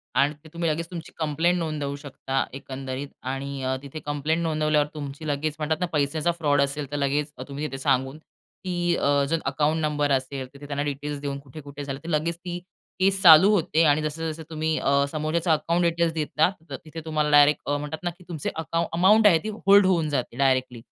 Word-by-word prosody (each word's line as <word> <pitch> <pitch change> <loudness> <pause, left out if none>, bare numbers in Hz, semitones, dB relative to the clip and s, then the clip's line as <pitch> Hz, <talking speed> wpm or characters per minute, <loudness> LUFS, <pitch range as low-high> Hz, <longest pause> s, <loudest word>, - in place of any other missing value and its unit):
आणि 140 +2 +3
ते 160 - -14
तुम्ही 170 -1 -1
लगेच 165 +2 -2
तुमची 170 -2 -7
कंप्लेंट 160 +3 +1
नोंदवू 150 -4 -3
शकता 135 -2 -2
एकंदरीत. 135 +1 -6 0.2
आणि 135 0 -5
अ, 130 0 0
तिथे 140 +3 -7
कंप्लेंट 150 +3 -1
नोंदवल्यावर 155 -2 +1
तुमची 150 0 -7
लगेच 150 +1 -1
म्हणतात 155 +1 -1
ना, 180 - +1
पैशाचा 150 +3 +1
फ्रॉड 145 -4 +1
असेल 140 0 -2
तर 145 - -2
लगेच 145 +1 0 0.2
तुम्ही 145 +2 -4
तिथे 135 - -6
सांगून, 135 0 0
की 175 +2 -4
अ, 140 -2 +2
जर 165 +1 +1
अकाउंट 150 +4 +1
नंबर 150 -2 0
असेल, 130 0 -1
तिथे 140 +1 -11
त्यांना 145 0 -2
डिटेल्स 145 0 -4
देऊन 140 -1 -3
कुठे 140 +2 -11
कुठे 145 0 -8
झालं 135 -1 -5
तर 165 - -7
लगेच 165 +1 0
ती 175 0 -6 0.4
केस 190 0 +3
चालू 175 +2 +9
होते. 165 -5 +2
आणि 150 -1 +4
जसं, 160 +1 -3
जसं 160 +1 -8
तुम्ही 160 0 -1
अ, 140 0 +2
समोरच्याच 155 +3 -2
अकाउंट 170 +3 0
डिटेल्स 170 -1 +1
देता, 155 +1 +1 0.2
तर 135 - -4
तिथे 160 +1 -8
तुम्हाला 155 -1 0
डायरेक्ट 145 +1 +5
अ, 145 - +1
म्हणतात 150 +3 -6
ना, 175 - 0
की 180 - -17
तुमचे 160 -5 -3
अकाउं 165 +1 -1
अमाउंट 205 +6 +5
आहे 170 -5 +5
ती 215 - -3 0.2
होल्ड 200 0 +7
होऊन 170 -5 +2
जाते 130 -4 -2
डायरेक्टली. 130 -3 +1
150 Hz, 205 wpm, -25 LUFS, 140-165 Hz, 0.4 s, चालू